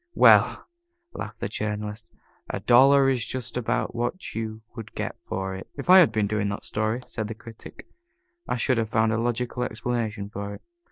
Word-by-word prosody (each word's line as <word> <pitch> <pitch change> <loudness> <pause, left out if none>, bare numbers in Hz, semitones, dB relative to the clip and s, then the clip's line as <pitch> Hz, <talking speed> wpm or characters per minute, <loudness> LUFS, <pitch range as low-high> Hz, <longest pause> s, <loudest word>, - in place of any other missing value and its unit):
"Well," - - +5 0.5
laughed 110 +1 -7
the - - -1
Journalist, 105 +1 -4 0.4
"a - - -3
dollar 135 +3 +6
is 130 -4 +1
just 130 0 -4
about 125 0 -1
what 120 +10 -3
you 110 0 -5
would 110 -3 -9
get - - -4
for 95 0 -4
it." 95 - -8
"If 145 +5 0
I 190 - +10
had 165 -10 +6
been 110 -2 +1
doing 105 0 -1
that 100 - -5
story," 110 +4 -1
said 110 -2 -4
the 115 - -6
Critic, 115 0 -12 0.6
"I - - 0
should 125 0 +1
have 110 -1 -1
found 110 0 +2
a 110 - 0
logical 120 +1 -2
explanation 110 -3 -2
for 100 0 -6
it." - - -15
110 Hz, 185 wpm, -25 LUFS, 105-125 Hz, 0.6 s, I